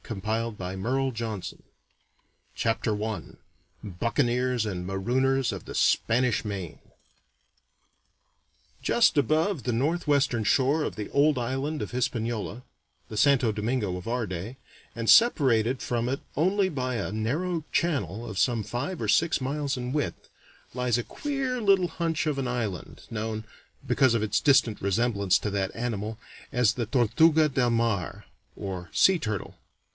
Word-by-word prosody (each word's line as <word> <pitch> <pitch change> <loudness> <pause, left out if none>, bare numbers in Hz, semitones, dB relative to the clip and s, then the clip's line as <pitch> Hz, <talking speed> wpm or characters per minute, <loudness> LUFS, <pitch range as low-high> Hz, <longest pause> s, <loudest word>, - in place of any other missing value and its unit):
Howard 110 +1 -3
Pyle 115 +9 -2 1.4
Chapter 110 -2 0
I 110 -2 -3 0.6
BUCCANEERS 120 - 0
AND 90 -4 -4
MAROONERS 125 +7 +1
OF - - -7
THE - - -8
SPANISH 125 +1 +2
MAIN 95 -6 -5 2.0
Just 230 -9 +3
above 155 - +1
the 125 - -1
northwestern 140 -2 +1
shore 140 +7 +2
of - - -4
the 105 - -5
old 145 0 +3
island 135 +5 -2
of - - -4
Hispaniola 120 -2 -2 0.4
the 110 - -8
Santo 120 -1 +3
Domingo 105 -2 -1
of 90 +2 -7
our 120 -1 -1
day 95 +8 -6 0.4
and 115 -1 -2
separated 130 - +5
from 120 0 -1
it 135 - -1 0.2
only 190 +5 +2
by 130 -7 -2
a 115 - -3
narrow 155 +10 -1
channel 120 - -1
of 105 - -6
some 120 -4 +2
five 145 - -4
or - - -1
six 165 - +3
miles 140 +1 -2
in 125 +1 -4
width, 150 -1 -3 0.5
lies 125 -1 +1
a 120 - -2
queer 270 - -3
little 195 -4 +4
hunch 170 0 -2
of 150 -2 0
an 130 -2 -2
island, 110 -7 -4
known, 110 0 -4 0.4
because 130 -3 +3
of 115 -2 +1
a - - 0
distant 130 -2 +3
resemblance 100 -1 +2
to 105 - -3
that 95 -1 -1
animal, 110 -2 -3 0.3
as 120 -2 +3
the 120 -3 -3
Tortuga 155 +7 +4
de 130 -4 +1
Mar, 115 -7 -1 0.3
or 95 -3 -5
sea 190 -1 +5
turtle. 110 -7 -4
120 Hz, 140 wpm, -27 LUFS, 110-140 Hz, 2.0 s, separated